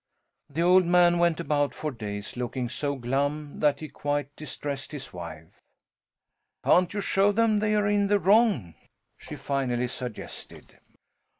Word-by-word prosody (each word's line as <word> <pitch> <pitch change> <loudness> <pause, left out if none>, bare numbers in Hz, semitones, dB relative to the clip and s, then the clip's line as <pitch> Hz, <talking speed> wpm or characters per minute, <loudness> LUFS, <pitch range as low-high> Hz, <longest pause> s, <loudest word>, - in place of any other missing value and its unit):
The 160 +4 -1
old 180 0 +5
man 175 0 +5
went 170 -2 +2
about 145 -3 0
for 155 - -3
days 105 -4 -6
looking 125 0 -3
so 140 +3 -2
glum 140 +4 -2
that 150 0 +2
he 155 - -5
quite 145 0 -3
distressed 145 -2 -6
his 140 -7 -8
wife. 80 -2 -10 1.0
"Can't 180 -1 +4
you 205 - -2
show 195 +1 +3
them 220 0 +2
they 215 0 +1
are 210 -1 +2
in 205 0 +2
the 205 +1 +3
wrong?" 195 - +3 0.5
she - - -8
finally 135 -3 -1
suggested. 125 -2 -9
145 Hz, 145 wpm, -27 LUFS, 130-180 Hz, 1.0 s, old